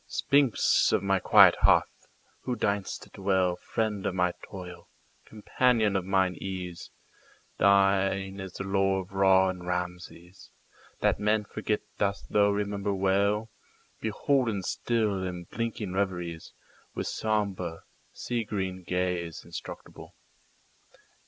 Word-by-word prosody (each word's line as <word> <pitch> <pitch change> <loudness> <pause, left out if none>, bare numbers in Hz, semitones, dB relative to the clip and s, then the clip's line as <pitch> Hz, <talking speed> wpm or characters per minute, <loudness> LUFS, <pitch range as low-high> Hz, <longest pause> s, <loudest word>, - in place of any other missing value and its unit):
Sphinx 140 -4 +3
of - - +1
my 95 -1 +2
quiet - - +7
hearth! - - +2 0.3
who 125 - -2
deign'st 100 -3 -2
to - - -17
dwellFriend 95 +2 -1
of 95 - -2
my 90 -1 +1
toil, 90 -2 -10 0.4
companion 110 -1 +1
of 95 - +1
mine 95 -1 +2
ease, 90 -3 -6 0.7
Thine 95 0 +3
is 95 -2 -7
the - - -5
lore 95 0 +1
of 95 - -13
Ra 95 -1 +4
and 90 -1 -6
Rameses; 90 0 -6 0.5
That - - +2
men 105 0 +1
forget 105 +1 -2 0.2
dost 100 -1 -2
thou 100 -1 +4
remember 100 0 -1
well, 100 +3 +1 0.5
Beholden 110 -2 0
still 110 -2 -1
in 90 -1 -5
blinking 110 +1 -4
reveriesWith 90 -4 -5
sombre, 100 -6 -2 0.3
sea 120 -2 -3
green 95 -3 -4
gaze 90 -2 -2
inscrutable. - - -9
95 Hz, 115 wpm, -28 LUFS, 90-105 Hz, 0.7 s, quiet